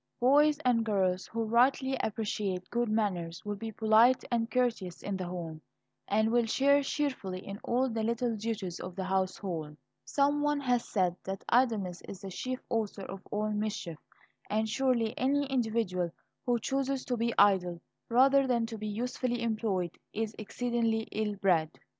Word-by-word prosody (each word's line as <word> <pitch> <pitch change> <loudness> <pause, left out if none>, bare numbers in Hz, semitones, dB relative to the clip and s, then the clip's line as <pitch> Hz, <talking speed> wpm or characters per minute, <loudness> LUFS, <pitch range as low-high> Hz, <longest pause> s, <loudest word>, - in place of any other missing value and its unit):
Boys 290 +4 +5
and 240 -2 +3
girls 190 -4 0
who 230 0 -2
rightly 260 +4 +3
appreciate 205 -4 -2
good 240 -1 0
manners 185 -6 -1
will 205 0 -2
be 225 +2 -5
polite 220 +4 +4
and 230 -1 +1
courteous 230 -9 -1
in 200 - -2
the 185 -1 -4
home, 165 -3 -6 0.5
and 220 +2 +2
will 235 -1 +3
share 280 +5 +4
cheerfully 270 -10 -2
in 200 +1 -6
all 250 +2 +1
the 225 -2 -2
little 235 +1 0
duties 210 -5 -3
of 180 -1 -7
the 190 - -3
household. 185 -5 -2 0.3
Some 285 +1 +1
one 295 0 +1
has 245 -3 0
said 180 -4 +1
that 195 0 -5
idleness 220 -8 +2
is 195 - -8
"the 195 -2 -7
chief 255 +7 -3
author 215 -4 -2
of 190 0 -7
all 215 +1 -1
mischief." 210 -6 -3 0.5
And 220 +1 +1
surely 235 -1 +1
any 285 +2 +2
individual 225 -9 0 0.4
who 245 -1 +3
chooses 270 +2 -1
to 250 - -1
be 235 0 -1
idle 185 -4 +4 0.3
rather 270 +3 +5
than 235 -2 +2
to 225 -1 -7
be 215 - -4
usefully 240 +2 -2
employed, 215 -6 -1
is 220 0 -2
exceedingly 230 0 0
ill 210 -1 -1
bred. 180 -6 +2
220 Hz, 165 wpm, -30 LUFS, 195-245 Hz, 0.5 s, Boys